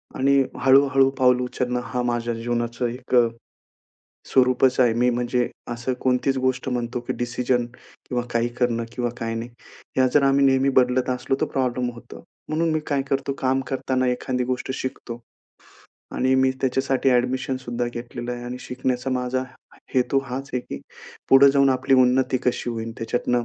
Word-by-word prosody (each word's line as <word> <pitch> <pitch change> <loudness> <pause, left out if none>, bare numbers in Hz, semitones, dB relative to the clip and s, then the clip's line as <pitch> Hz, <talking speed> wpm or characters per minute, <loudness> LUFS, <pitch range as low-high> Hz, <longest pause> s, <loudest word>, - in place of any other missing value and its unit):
आणि 135 +1 +3 0.2
हळू-हळू 135 0 +5
पाऊल 125 -1 +4
उचलणं, 125 0 -2
हा 125 +1 -3
माझ्या 120 -1 -1
जीवनाचं 120 +1 -2
एक, 125 +2 -4 1.1
स्वरूपच 130 0 +3
आहे. 120 -2 +5
मी 120 +2 +2
म्हणजे 120 0 0 0.2
असं 120 +2 -3
कोणतीच 130 +1 +1
गोष्ट 130 0 -1
म्हणतो, 120 -1 -2
की 120 - -4
डिसिजन 120 0 0
किंवा 125 0 -7
काही 115 0 +1
करणं 115 -2 +1
किंवा 120 -1 -2
काय 115 0 -3
नाही. 115 +1 -4 0.5
ह्या 130 0 +4
जर 145 - +5
आम्ही 140 0 +4
नेहमी 135 0 +3
बदलत 125 0 +2
असलो, 125 +1 -1
तर - - +1
प्रॉब्लेम 125 -2 0
होतो. 115 - -12 0.2
म्हणून 160 +2 0
मी 155 - 0
काय 140 -2 0
करतो 135 0 0
काम 130 0 +1
करताना 130 -1 -1
एखादी 125 0 -1
गोष्ट 125 +1 -3
शिकतो. 120 -2 -6 0.9
आणि 130 +1 +2
मी 130 0 +3
त्याच्यासाठी 135 0 +1
ॲडमिशन 130 +1 +1
सुद्धा 120 -2 -3
घेतलेलं 120 0 -6
आहे 120 0 -6
आणि 125 +1 -5
शिकण्याचा 125 0 -2
माझा 130 0 -1 0.5
हेतू 130 +1 +2
हाच 135 +2 -6
आहे, 125 - 0
की 70 - -8 0.5
पुढे 135 +1 +7
जाऊन 140 -1 +4
आपली 130 +1 +2
उन्नती 130 0 +3
कशी 125 -1 -1
होईन, 115 -1 -4
त्याच्यातनं 120 +1 -1
125 Hz, 160 wpm, -23 LUFS, 120-130 Hz, 1.1 s, पुढे